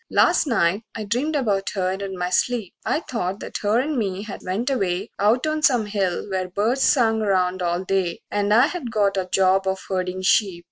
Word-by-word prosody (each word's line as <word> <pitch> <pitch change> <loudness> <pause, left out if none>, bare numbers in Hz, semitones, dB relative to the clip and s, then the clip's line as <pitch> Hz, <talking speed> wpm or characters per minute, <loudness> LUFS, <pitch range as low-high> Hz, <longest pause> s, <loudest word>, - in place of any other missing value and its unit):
XIII - - -11
Last - - +4
night 205 -4 +1
I 220 - -4
dreamed 250 +9 -1
about 205 -8 0
her 185 -1 0
in 190 0 -5
my 180 0 -2
sleep; 230 -1 0
I 310 - 0
thought 200 - -3
that - - -5
her 210 +2 +2
and 285 0 -1
me 195 -2 -2
had 210 -2 -8
went 210 +9 -2
away 195 -4 -1
Out 220 +7 +2
on 310 0 -1
some 245 -7 +3
hill 200 -4 -2
where 185 -2 -2
birds 220 +8 0
sung 225 -6 +3
'round 185 -3 +1
all 175 +1 -1
day, 190 -3 -1
And 205 0 0
I 235 +5 +6
had 320 -5 -4
got 205 -3 +1
a 185 -1 -2
job 190 0 +3
of 190 0 0
herdin' 185 0 -2
sheep. 190 -2 +2
200 Hz, 215 wpm, -22 LUFS, 185-235 Hz, -, I